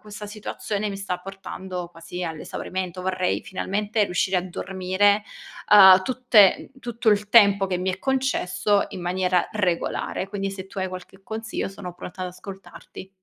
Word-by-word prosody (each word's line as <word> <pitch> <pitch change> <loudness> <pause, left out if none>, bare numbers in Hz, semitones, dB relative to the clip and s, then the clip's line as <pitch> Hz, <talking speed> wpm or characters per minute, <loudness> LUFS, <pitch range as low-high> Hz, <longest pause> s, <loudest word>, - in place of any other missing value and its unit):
questa 210 0 -9
situazione 210 0 -4
mi 195 - -5
sta 195 -2 -3
portando 190 -2 -7
quasi 170 +1 -8
all'esaurimento. 180 +3 -5
Vorrei 185 -1 -1
finalmente 205 +3 -1
riuscire 185 0 0
a - - -3
dormire, 190 +3 +1 0.5
uhm, 190 -2 +9
tutte 250 -6 +4
tutto 235 -2 0
il 205 0 +1
tempo 200 -3 +6
che 185 - -1
mi 185 +1 -1
è 190 - -6
concesso, 255 -6 +1
in 185 -2 -8
maniera 180 0 +1
regolare. 185 -2 -1
Quindi 195 -1 -3
se 195 -1 -8
tu 195 - -9
hai 190 0 -1
qualche 185 +1 -9
consiglio, 220 0 -4
sono 195 -2 -8
pronta 185 +2 -9
ad 180 - -3
ascoltarti. 190 0 -11
195 Hz, 155 wpm, -24 LUFS, 185-205 Hz, 0.5 s, uhm